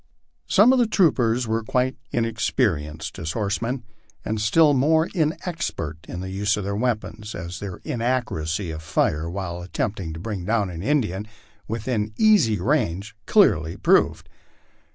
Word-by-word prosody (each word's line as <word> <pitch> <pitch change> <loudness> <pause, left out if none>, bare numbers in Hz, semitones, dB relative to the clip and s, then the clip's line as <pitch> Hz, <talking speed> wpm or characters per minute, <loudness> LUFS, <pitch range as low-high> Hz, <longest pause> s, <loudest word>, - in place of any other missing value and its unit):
Some 225 - +6
of 260 - +3
the 240 - +3
tro' 190 -7 +4
^ers 120 0 0
were 110 0 -1
quite 125 +3 0 0.2
inexperienced 105 - -1
as 80 0 -3
horsemen, 115 +4 -2 0.4
and 110 0 -2
still 150 +8 +5
more 160 +5 +3
inexpert 155 - -2
i>>iile 95 +2 -5
use 100 +2 +1
of 105 - -3
their 100 +1 -2
weapons, 110 -2 -2
as 85 0 -6
their 100 -3 -6
inaccuracy 115 - -1
of 80 0 -6
fire 80 +1 0
when 90 -1 -4
at 90 - -11
temptin^ 90 -6 -2
kTbring 100 0 -4
down 105 -1 0
an 85 -1 -6
Indian 105 -6 0 0.4
within 110 -1 -2
easy 200 - +4
range 110 - 0
clearly 85 - +3
proved. - - +2
110 Hz, 145 wpm, -23 LUFS, 90-130 Hz, 0.4 s, Some